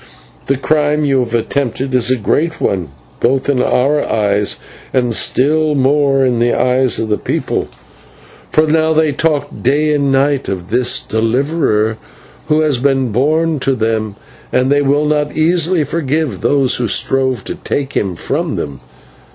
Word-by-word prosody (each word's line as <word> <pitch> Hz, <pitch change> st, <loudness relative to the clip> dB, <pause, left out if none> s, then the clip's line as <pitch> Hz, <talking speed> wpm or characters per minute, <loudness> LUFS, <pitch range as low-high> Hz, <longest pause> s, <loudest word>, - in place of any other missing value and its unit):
The 135 Hz, -, +1 dB
crime 150 Hz, +1 st, +1 dB
you 135 Hz, -2 st, +2 dB
have 120 Hz, -2 st, -1 dB
attempted 130 Hz, +2 st, -2 dB
is 125 Hz, -1 st, +2 dB
a 130 Hz, -, +3 dB
great 155 Hz, +9 st, -1 dB
one, 90 Hz, -6 st, -1 dB, 0.3 s
both 130 Hz, +2 st, +1 dB
in 135 Hz, -3 st, +1 dB
our 140 Hz, +4 st, +2 dB
eyes 105 Hz, -1 st, +1 dB, 0.4 s
and 125 Hz, -3 st, 0 dB
still 150 Hz, +6 st, +1 dB
more 135 Hz, 0 st, +2 dB
in 125 Hz, -2 st, +1 dB
the 120 Hz, +1 st, +1 dB
eyes 130 Hz, 0 st, +2 dB
of 115 Hz, -, -2 dB
the 105 Hz, -1 st, -1 dB
people, -, -, -2 dB, 0.8 s
for 155 Hz, -, +3 dB
now 160 Hz, +1 st, +2 dB
they 155 Hz, -1 st, +2 dB
talk 150 Hz, 0 st, 0 dB
day 150 Hz, +4 st, +2 dB
and 140 Hz, -2 st, +1 dB
night 140 Hz, 0 st, +1 dB
of 95 Hz, -1 st, -5 dB
this 125 Hz, +1 st, +2 dB
Deliverer 115 Hz, -1 st, 0 dB, 0.5 s
who 155 Hz, 0 st, +2 dB
has 150 Hz, -5 st, +1 dB
been 135 Hz, -2 st, +1 dB
born 155 Hz, +6 st, +1 dB
to 135 Hz, 0 st, 0 dB
them, 110 Hz, -3 st, -2 dB, 0.4 s
and 130 Hz, +2 st, +1 dB
they 145 Hz, 0 st, +3 dB
will 145 Hz, +2 st, +1 dB
not 150 Hz, 0 st, -1 dB
easily 165 Hz, +1 st, +2 dB
forgive 150 Hz, -, -2 dB
those 140 Hz, -3 st, +2 dB
who 120 Hz, -, -1 dB
strove 130 Hz, -1 st, 0 dB
to -, -, -5 dB
take 140 Hz, -1 st, -4 dB
him 95 Hz, -3 st, -1 dB
from -, -, -2 dB
them. 70 Hz, -2 st, -5 dB
135 Hz, 160 wpm, -15 LUFS, 120-150 Hz, 0.8 s, a